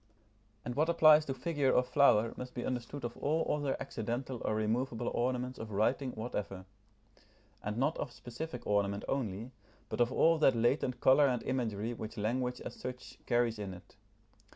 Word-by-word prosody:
And 125 - -3
what 155 +5 +1
applies 155 -2 +6
to 135 - -2
figure 145 -1 +1
or 125 - +4
flower 125 -4 +4
must 125 +1 -8
be 120 - -3
understood 125 +2 -4
of 120 - -4
all 160 +3 0
other 145 -2 -1
accidental 120 0 -4
or 110 - 0
removable 115 +2 -1
ornaments 125 +1 -1
of 110 - -6
writing 120 +6 0
whatever; 105 -4 -5 1.0
and 105 +1 -3
not 140 +6 +1
of - - -3
specific 125 +2 -7
ornament 100 0 0
only, 115 -2 -2 0.4
but - - -1
of 120 +1 +3
all 165 +3 +4
that 135 -5 +5
latent 125 +2 +1
colour 140 +2 +6
and 125 -3 -1
imagery 115 -3 -2
which 110 -1 -7
language 125 +4 -1
as - - -6
such 125 0 -8
carries 120 -2 +1
in 95 -3 -5
it. 90 - -16
125 Hz, 170 wpm, -33 LUFS, 110-135 Hz, 1.0 s, applies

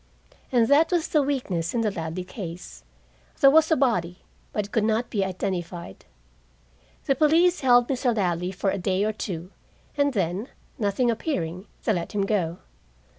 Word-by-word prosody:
And 235 -3 +3
that 300 +6 +4
was 345 -2 +1
the 305 - +3
weakness 245 - -2
in 235 - +2
the 215 -2 +1
Ladley 165 0 -4
case. 170 - -8 0.6
There 275 - +7
was 315 +1 +5
a 320 - +4
body, 185 - 0 0.3
but 210 - -2
it 205 - -14
could 225 - +1
not 220 +2 0
be 200 -3 +1
identified. 180 - -4 1.0
The - - +3
police 325 +6 +3
held 245 -2 +5
Mr. 250 -3 0
Ladley 180 -2 0
for 195 +1 -1
a 200 - -2
day 190 +2 0
or 215 +1 0
two, 180 -4 -5 0.4
and 285 -1 +2
then, 190 +2 -1 0.3
nothing 225 +3 +1
appearing, 185 - -3 0.2
they 220 - +2
let 170 -3 -4
him 200 -1 0
go. 180 -5 -1
210 Hz, 170 wpm, -25 LUFS, 180-255 Hz, 1.0 s, There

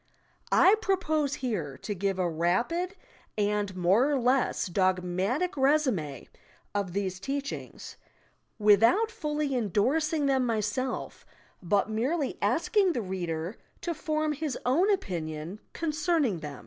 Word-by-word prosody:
I 385 - +6
propose 315 -8 0
here 195 - -3
to 210 - -4
give 195 0 -1
a 185 -1 +1
rapid 235 - 0 0.4
and 205 -2 0
more 190 +10 +3
or 290 - +2
less 255 +2 +1
dogmatic 185 - 0
resumi 265 - +1 0.5
of 200 -4 -2
these 190 -2 -2
teachings 275 +7 -5 0.3
— - - -35 0.3
without 225 - +4
fully 300 -6 -2
endorsing 280 - +1
them 265 -2 +2
myself, 230 +2 -2 0.4
but 200 +3 +1
merely 270 +7 -1
asking 395 -5 +2
the 240 - -1
reader 175 -1 -4 0.2
to 345 - -2
form 310 -2 -1
his 295 -3 -3
own 320 +11 +3
opinion 170 - -3
concerning 305 - 0
them. 150 -3 -7
235 Hz, 120 wpm, -28 LUFS, 185-300 Hz, 0.5 s, I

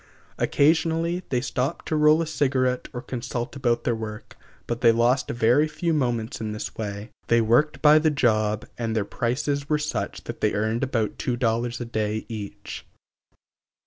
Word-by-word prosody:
Occasionally 165 +3 +2
they 125 -2 +1
stopped 135 +3 -2
to 155 - +1
roll 155 +2 +5
a - - -3
cigarette 130 -4 0
or 125 - -6
consult 120 -1 -4
about 120 -3 0
their 120 - +1
work, 110 -1 -7 0.3
but 120 0 -3
they 115 - +7
lost 120 +3 +2
very 120 +6 +3
few 165 +2 -1
moments 120 -7 -1
in 110 -1 -3
this 105 - -6
way. 105 0 -5 0.2
They 115 - +4
worked 120 +9 +2
by 150 0 +8
the 155 0 +3
job 110 -7 +1
and 115 -1 -1
their 105 -2 0
prices 140 +6 -2
were 150 - +3
such 150 0 -3
that - - -7
they 105 - +1
earned 110 +3 0
about 115 -5 -1
two 125 -1 -1
dollars 120 0 0
a 120 - -4
day 110 -1 -2
each. 105 -3 -7
120 Hz, 175 wpm, -25 LUFS, 110-145 Hz, 0.3 s, by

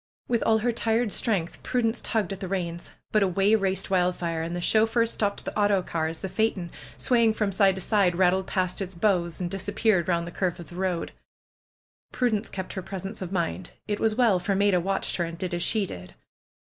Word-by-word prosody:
With 235 -2 +1
all 220 - +5
her 240 +2 +1
tired 225 -1 0
strength 190 -8 0
Prudence 235 -2 0
tugged 210 -4 -1
at 190 - -8
the 190 - -4
reins. 175 -2 -3 0.2
But 215 - +3
away 195 +2 +3
raced 195 -3 +1
Wildfire. 180 -3 +1
And 170 +2 -3
the - - -2
chauffeur 225 +5 +3
stopped 205 -3 -1
the - - -5
autocar 190 -6 +1
as 160 0 -5
the 190 - -3
phaeton, 190 -4 -1 0.3
swaying 230 -3 +3
from 210 -3 0
side 195 0 +3
to 190 - -5
side, 190 -3 +2
rattled 185 +1 +2
past 185 0 -1
its 190 -1 -4
'^bows'^ 170 -3 +1
and 175 -1 -3
disappeared 195 -1 +1
round 170 -1 0
a - - -6
curve 180 -1 -2
of 170 - -10
the 175 - -11
road. 180 -2 -2 1.0
Prudence 230 -4 0
kept 190 -1 -5
her 190 - -4
presence 195 +3 -6
of 185 -1 -5
mind. 130 - -2
It 205 -1 -1
was 220 -1 +1
well, 225 -7 +4
for 195 +2 -1
Maida 200 -2 +3
watched 195 +3 -1
her, 175 - +1
and 170 0 -5
did 180 +1 -3
as 175 - -1
she 210 +2 +1
did. 90 - -9
190 Hz, 210 wpm, -26 LUFS, 175-215 Hz, 1.0 s, all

